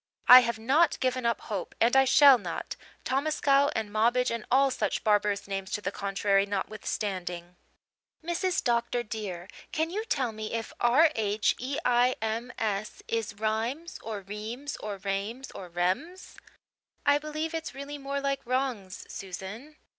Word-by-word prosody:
I 250 - +12
have 235 -2 -1
not 270 +10 +2
given 255 -2 0
up 235 - 0
hope, 200 -4 -5
and 235 +3 +3
I 270 0 +6
shall 275 -1 +7
not, 175 -5 -5 0.3
Tomascow 280 0 +2
and 220 -2 -2
Mobbage 240 +4 +2
and 230 -2 -3
all 270 +1 +4
such 210 -5 -1
barbarous 205 -1 +1
names 195 -1 -4
to 210 - -1
the 195 - -2
contrary 200 0 +1
notwithstanding. 190 -3 -4 0.7
Mrs. 355 +2 0
Dr. 240 -1 +1
dear, 200 -5 -6 0.2
can 320 +1 -1
you 425 +4 -2
tell 260 - 0
me 215 0 -6
if 225 -1 -4
R 285 +7 +5
h 210 -1 +1
e 265 +3 -3
i 245 +1 +3
m 225 +3 -3
s 215 -1 -3
is 225 -1 -2
Rimes 225 - -2
or 215 -2 -5
Reems 220 +8 -6
or 205 -2 -5
Rames 200 +6 -4
or 180 - -9
Rems?" 185 - -2 0.7
"I 285 0 +5
believe 305 +2 -4
it's 325 -3 -4
really 285 +1 -6
more 275 0 -3
like 275 -1 -1
'Rhangs,' 245 -7 -2
Susan." 195 +10 -8
230 Hz, 155 wpm, -28 LUFS, 205-275 Hz, 0.7 s, I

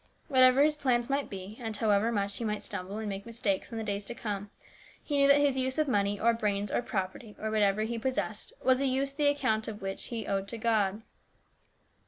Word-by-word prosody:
What 260 -3 +4
ever 255 +2 +7
his 305 0 +4
plans 250 -3 +1
might 280 +1 0
be, 195 +2 -8
and 220 -2 -3
however 215 +1 +2
much 200 -2 -1
he - - -4
might 210 -1 -2
stumble 190 +3 -5
and 220 -1 -4
make 195 -1 -4
mistakes 225 -4 -2
in 230 - -5
the 225 - -2
days 205 -1 -2
to 235 - -5
come, 205 -3 -4 0.5
he 290 - -2
knew 280 0 +5
that 280 0 +7
his 285 -2 +2
use 260 +1 -1
of 310 -1 +2
money 205 -4 +1
or 235 +1 +4
brains 205 -3 -1
or - - +1
property, 205 +1 -4
or 220 0 -2
whatever 210 -1 +2
he 230 +1 -3
possessed, 260 +3 -2
was 260 0 +4
a 275 - +2
use 270 +1 0
the 290 0 +2
account 255 -7 0
of 210 -2 -6
which 195 0 -4
he 230 -3 -4
owed 195 0 -1
to 230 - -5
God. 220 -2 +1
220 Hz, 230 wpm, -30 LUFS, 205-260 Hz, 0.5 s, ever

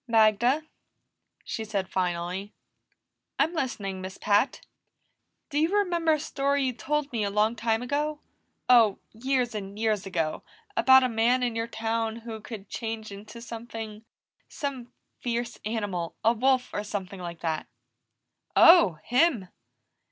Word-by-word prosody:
"Magda," 230 +5 +4 0.8
she 220 - -4
said 200 -3 -2
finally. 180 +2 -2 0.8
"I'm 300 +5 +2
listening, 205 - -3
Miss 185 0 -7
Pat." 210 +5 +1 0.9
"Do 295 - +1
you 320 +2 +3
remember 345 -5 +2
a 305 - 0
story 280 -1 0
you 255 - 0
told 290 +5 -2
me 225 -3 0
a 200 - 0
long 210 +3 +2
time 225 0 0
ago? 295 +3 -1 0.5
Oh, 230 -5 +6 0.2
years 250 +1 0
and 200 -1 -6
years 215 -3 0
ago, 165 -4 -1 0.3
about 260 +3 +7
a - - +3
man 240 +2 +2
in 240 -2 -1
your 225 0 -1
town 225 0 -2
who 230 -1 -7
could 210 -2 -8
change 225 -1 -5
into 215 +4 -10
something 225 -2 -7 0.4
some 260 -4 -5 0.3
fierce 240 0 -3
animal. 205 -6 -3
A 225 - +5
wolf, 255 +2 +1
or 205 - -2
something 195 -2 -5
like 170 -2 -7
that." 160 -2 -2 0.9
"Oh, 335 - +8
him!" 245 - +2
225 Hz, 140 wpm, -27 LUFS, 205-255 Hz, 0.9 s, Oh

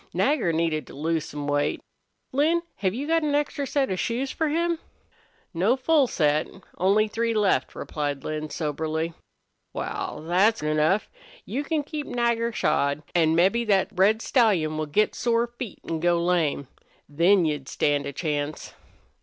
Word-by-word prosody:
"Nagger 260 - +2
needed 160 -2 -1
to - - -12
lose 160 +2 -1
some 145 0 -6
weight. 145 0 0 0.5
Lin, 320 +5 +2
have 190 0 -1
you 270 +4 -3
got 330 +1 +2
an 295 -2 0
extra 290 -1 -1
set 275 -6 0
of 185 - -2
shoes 255 +3 -1
for 320 - -1
him?" 335 +2 0 0.7
"No 190 +9 +2
full 280 +1 +3
set. 150 -6 +1 0.3
Only 200 +4 +3
three 230 +1 -1
left," 210 -3 +1
replied 145 -2 -3
Lin, 155 0 -4
soberly. 160 +2 -2 0.6
"Wal, 155 - -4
thet's 195 +3 +3
enough. 155 +6 +2 0.4
You 280 - -3
can 305 0 -1
keep 295 0 -5
Nagger 235 -1 0
shod. 150 -6 0
An' 160 -2 +3
mebbe 195 +7 +3
thet 195 -2 +3
red 210 +3 +3
stallion 190 - +2
will 155 0 -2
get 210 +9 +2
sore 235 -1 +1
feet 240 -2 -8
an' 165 - -2
go 175 +1 +2
lame. 170 -5 0 0.4
Then 170 +5 +3
you'd 145 -3 -2
stand 145 -1 0
a - - -3
chance." 150 -1 -3
185 Hz, 160 wpm, -25 LUFS, 155-240 Hz, 0.7 s, full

